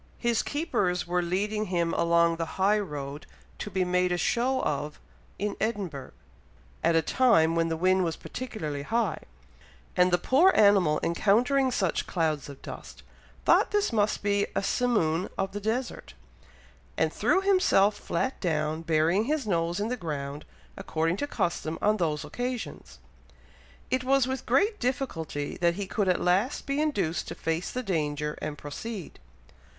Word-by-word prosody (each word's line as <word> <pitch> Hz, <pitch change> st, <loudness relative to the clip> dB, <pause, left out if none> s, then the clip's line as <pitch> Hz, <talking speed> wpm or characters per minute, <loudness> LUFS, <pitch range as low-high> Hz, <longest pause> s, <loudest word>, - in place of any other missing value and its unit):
His 235 Hz, -2 st, +1 dB
keepers 200 Hz, -, -1 dB
were 180 Hz, 0 st, 0 dB
leading 205 Hz, +5 st, -1 dB
him 170 Hz, -3 st, 0 dB
along 170 Hz, 0 st, +3 dB
the 165 Hz, -1 st, -5 dB
high 200 Hz, +3 st, +3 dB
road 145 Hz, -6 st, -6 dB, 0.3 s
to -, -, -4 dB
be 190 Hz, -2 st, 0 dB
made 180 Hz, 0 st, +1 dB
a 175 Hz, -, +1 dB
show 250 Hz, +8 st, +1 dB
of 150 Hz, +1 st, -2 dB, 0.4 s
in 205 Hz, 0 st, -2 dB
Edinburgh, 190 Hz, -, -3 dB, 0.7 s
at 165 Hz, 0 st, +3 dB
a 165 Hz, -, +3 dB
time 190 Hz, -, +4 dB
when 165 Hz, 0 st, +2 dB
the 165 Hz, 0 st, -2 dB
wind 185 Hz, +2 st, +3 dB
was 165 Hz, -2 st, -1 dB
particularly 160 Hz, -, -5 dB
high; 220 Hz, +2 st, 0 dB, 0.8 s
and 180 Hz, 0 st, +4 dB
the 175 Hz, -, +4 dB
poor 310 Hz, -, +4 dB
animal 195 Hz, -7 st, +5 dB
encountering 245 Hz, +10 st, +2 dB
such 190 Hz, -8 st, 0 dB
clouds 155 Hz, -5 st, -1 dB
of 140 Hz, -, -11 dB
dust, -, -, -9 dB, 0.4 s
thought -, -, +5 dB
this 415 Hz, -, 0 dB
must 210 Hz, -1 st, +1 dB
be 200 Hz, 0 st, +1 dB
a -, -, 0 dB
simoon 195 Hz, -9 st, +1 dB
of 195 Hz, -, -1 dB
the 205 Hz, -, -4 dB
desert, 235 Hz, +4 st, -3 dB, 0.8 s
and -, -, +1 dB
threw -, -, +2 dB
himself 370 Hz, -, +4 dB
flat 260 Hz, +5 st, -2 dB
down, 155 Hz, -2 st, -1 dB
burying 165 Hz, +5 st, +2 dB
his 295 Hz, -1 st, -1 dB
nose 170 Hz, -2 st, 0 dB
in 210 Hz, +2 st, -1 dB
the 250 Hz, -, -1 dB
ground, 145 Hz, -, -5 dB, 0.3 s
according 165 Hz, +3 st, -1 dB
to 290 Hz, -, -2 dB
custom 165 Hz, -, -2 dB
on 215 Hz, +1 st, +2 dB
those 155 Hz, -5 st, -1 dB
occasions. 245 Hz, -1 st, -5 dB, 0.9 s
It 255 Hz, 0 st, +1 dB
was 270 Hz, 0 st, +3 dB
with 260 Hz, 0 st, -4 dB
great 405 Hz, -, +2 dB
difficulty 165 Hz, -, -3 dB
that 170 Hz, -1 st, +2 dB
he 200 Hz, +1 st, -3 dB
could 200 Hz, +1 st, -1 dB
at 180 Hz, -, +2 dB
last 195 Hz, +10 st, +1 dB
be 280 Hz, +2 st, 0 dB
induced 200 Hz, -, -1 dB
to -, -, -6 dB
face 165 Hz, +2 st, -2 dB
the 255 Hz, -, -4 dB
danger, 150 Hz, -6 st, -1 dB
and 150 Hz, -1 st, -4 dB
proceed." 185 Hz, +6 st, -7 dB
185 Hz, 160 wpm, -27 LUFS, 165-235 Hz, 0.9 s, animal